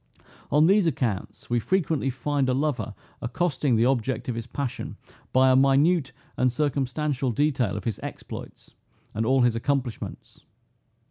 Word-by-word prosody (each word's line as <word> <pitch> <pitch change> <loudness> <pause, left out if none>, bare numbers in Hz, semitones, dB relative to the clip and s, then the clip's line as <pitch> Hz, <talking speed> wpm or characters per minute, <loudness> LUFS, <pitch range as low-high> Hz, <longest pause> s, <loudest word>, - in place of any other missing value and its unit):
On 150 +2 +5
these 195 0 +4
accounts, 115 - -2
we 120 0 +1
frequently 160 -2 0
find 135 +1 -1
a 125 - +2
lover 135 -6 -1 0.3
accosting 135 0 0
the 115 +1 +3
object 125 -2 0
of 125 - -1
his 115 -1 -5
passion 140 -4 -4 0.3
by 130 0 +5
a - - +5
minute 135 +3 +4 0.3
and 125 0 +3
circumstantial 140 0 -1
detail 130 -3 +1
of - - -6
his 115 -4 -2
exploits, - - -8 0.4
and 110 +1 -1
all 130 +1 +4
his 120 -2 +3
accomplishments. 130 -1 -3
130 Hz, 145 wpm, -26 LUFS, 120-145 Hz, 0.4 s, On